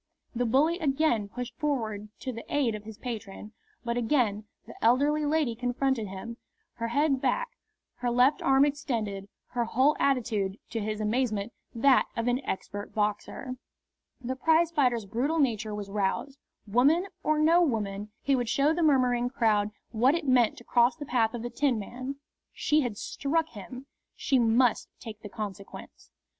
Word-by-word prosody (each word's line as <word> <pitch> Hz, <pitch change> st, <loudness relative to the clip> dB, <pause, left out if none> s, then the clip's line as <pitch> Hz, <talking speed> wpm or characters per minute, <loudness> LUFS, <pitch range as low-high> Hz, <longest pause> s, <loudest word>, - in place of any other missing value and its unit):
The 245 Hz, 0 st, 0 dB
bully 305 Hz, +9 st, +3 dB
again 275 Hz, -, +1 dB
pushed 245 Hz, +1 st, -6 dB
forward 220 Hz, -8 st, -2 dB
to 255 Hz, -, -4 dB
the 230 Hz, -, -7 dB
aid 270 Hz, -6 st, +1 dB
of 210 Hz, 0 st, -7 dB
his 220 Hz, -1 st, -9 dB
patron, 215 Hz, -4 st, -7 dB, 0.3 s
but 235 Hz, 0 st, -1 dB
again 225 Hz, -4 st, +1 dB, 0.2 s
the -, -, -11 dB
elderly 290 Hz, +6 st, +3 dB
lady 300 Hz, -5 st, +1 dB
confronted 245 Hz, -1 st, -1 dB
him, 195 Hz, +5 st, -7 dB, 0.4 s
her 230 Hz, -, -2 dB
head 275 Hz, +2 st, +1 dB
back, -, -, 0 dB, 0.5 s
her 245 Hz, -, -1 dB
left 250 Hz, +4 st, +3 dB
arm 270 Hz, +1 st, +5 dB
extended, 225 Hz, -9 st, -3 dB, 0.2 s
her 240 Hz, -1 st, -1 dB
whole 260 Hz, +6 st, +3 dB
attitude, 220 Hz, -8 st, 0 dB
to 225 Hz, -, -2 dB
his 215 Hz, 0 st, -3 dB
amazement, 215 Hz, -1 st, -1 dB, 0.2 s
that 260 Hz, +3 st, +4 dB
of 230 Hz, +1 st, -1 dB
an 250 Hz, +3 st, +1 dB
expert 205 Hz, +2 st, -5 dB
boxer. 215 Hz, +5 st, -2 dB, 0.6 s
The 260 Hz, 0 st, -4 dB
prizefighter's 295 Hz, -6 st, +2 dB
brutal 255 Hz, +11 st, -1 dB
nature 225 Hz, -7 st, 0 dB
was 200 Hz, -1 st, -6 dB
roused. 210 Hz, +8 st, -2 dB, 0.3 s
Woman 270 Hz, -, +3 dB, 0.2 s
or 310 Hz, 0 st, +1 dB
no 325 Hz, +3 st, +5 dB
woman, 210 Hz, -, -1 dB
he 275 Hz, -, +3 dB
would 245 Hz, -3 st, -1 dB
show 275 Hz, +6 st, +3 dB
the 345 Hz, -, -1 dB
murmuring 250 Hz, -5 st, +3 dB
crowd 215 Hz, -5 st, +2 dB, 0.2 s
what 245 Hz, +6 st, +3 dB
it 335 Hz, -2 st, -3 dB
meant 245 Hz, -4 st, +3 dB
to -, -, -12 dB
cross 240 Hz, +1 st, +3 dB
the 300 Hz, -2 st, -7 dB
path 240 Hz, -3 st, +1 dB
of 235 Hz, -, -5 dB
the 240 Hz, -, -4 dB
Tinman. 255 Hz, 0 st, -2 dB, 0.4 s
She 305 Hz, +1 st, +2 dB
had 240 Hz, -6 st, -3 dB
struck 320 Hz, +8 st, -1 dB
him. 245 Hz, +5 st, -9 dB, 0.3 s
She 265 Hz, -, +1 dB
must 235 Hz, +1 st, +3 dB
take 220 Hz, -3 st, -9 dB
the 205 Hz, -, -8 dB
consequence. 200 Hz, -2 st, -8 dB
245 Hz, 160 wpm, -28 LUFS, 215-275 Hz, 0.6 s, arm